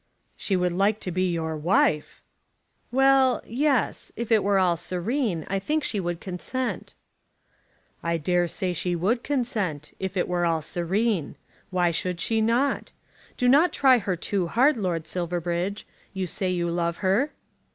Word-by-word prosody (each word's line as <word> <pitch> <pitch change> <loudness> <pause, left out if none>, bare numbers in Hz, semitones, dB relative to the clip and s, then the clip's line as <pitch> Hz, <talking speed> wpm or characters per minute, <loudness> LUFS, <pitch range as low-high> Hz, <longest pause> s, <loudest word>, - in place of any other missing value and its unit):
"She 195 - -1
would 180 -1 +1
like 200 +4 +1
to 180 - -3
be 185 +1 0
your 160 -1 -2
wife!" 155 -1 +1 0.7
"Well; 270 0 +4
yes. 270 +2 0
If 235 0 -5
it 220 -2 +4
were 200 0 +2
all 180 -2 +3
serene, 180 - -2
I 195 - -1
think 300 +9 -1
she 210 - -2
would 175 -2 -3
consent." 200 +9 -4 1.1
"I 170 0 0
dare 175 +2 +1
say 180 +2 -2
she 175 +1 -1
would 205 +8 +1
consent, 205 - -2
if 190 0 -3
it 180 - +1
were 175 -1 0
all 165 -2 +1
serene. 185 +1 -1 0.3
Why 180 -2 +2
should 180 +1 -2
she 225 +5 +1
not? 240 +5 +1 0.5
Do 250 - +1
not 295 +8 +5
try 260 -3 +5
her 195 -3 -1
too 180 +1 -1
hard, 260 - +3
Lord 180 -7 -2
Silverbridge. 175 +2 -2 0.3
You 190 -1 -1
say 185 +2 -2
you 175 -1 -1
love 170 0 -1
her." 215 +11 +3
185 Hz, 160 wpm, -25 LUFS, 175-230 Hz, 1.1 s, not